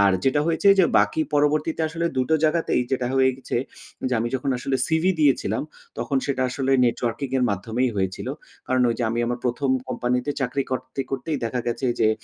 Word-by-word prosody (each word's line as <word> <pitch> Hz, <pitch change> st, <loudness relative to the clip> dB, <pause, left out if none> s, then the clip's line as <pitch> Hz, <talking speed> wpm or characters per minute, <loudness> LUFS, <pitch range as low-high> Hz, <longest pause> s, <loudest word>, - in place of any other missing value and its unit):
আর 100 Hz, -1 st, +5 dB
যেটা 135 Hz, +2 st, +3 dB
হয়েছে 165 Hz, +4 st, +2 dB
যে 185 Hz, -, +7 dB
বাকি 160 Hz, -, +2 dB
পরবর্তীতে 150 Hz, +2 st, +1 dB
আসলে 165 Hz, +2 st, -2 dB
২ 130 Hz, -, +3 dB
টো 160 Hz, -, +4 dB
জায়গাতেই 155 Hz, -4 st, +2 dB
যেটা 125 Hz, -2 st, 0 dB
হয়ে 130 Hz, 0 st, +5 dB
গেছে 130 Hz, -, -4 dB, 0.5 s
যে 125 Hz, -, 0 dB
আমি 120 Hz, -, -1 dB
যখন 130 Hz, +1 st, -1 dB
আসলে 130 Hz, +2 st, -1 dB
সিভি 160 Hz, +3 st, +2 dB
দিয়েছিলাম, 145 Hz, -3 st, +2 dB, 0.4 s
তখন 140 Hz, -, -1 dB
সেটা 135 Hz, -2 st, 0 dB
আসলে 135 Hz, +1 st, 0 dB
নেটওয়ার্কিং 120 Hz, +3 st, -1 dB
এর 125 Hz, -, +2 dB
মাধ্যমেই 110 Hz, +6 st, -1 dB
হয়েছিল। 95 Hz, -1 st, -2 dB, 0.4 s
কারণ 130 Hz, 0 st, +2 dB
ওই -, -, 0 dB
যে -, -, -1 dB
আমি 115 Hz, -, -2 dB
আমার 120 Hz, +1 st, -2 dB
১ম, 130 Hz, +2 st, 0 dB, 0.2 s
কোম্পানিতে 125 Hz, +2 st, -1 dB
চাকরি 135 Hz, +1 st, 0 dB
করতে, 130 Hz, +1 st, -3 dB
করতেই 135 Hz, +3 st, -2 dB
দেখা 125 Hz, +2 st, -1 dB
গেছে 120 Hz, +2 st, -1 dB
যে 110 Hz, -, +5 dB
130 Hz, 190 wpm, -24 LUFS, 125-145 Hz, 0.5 s, যে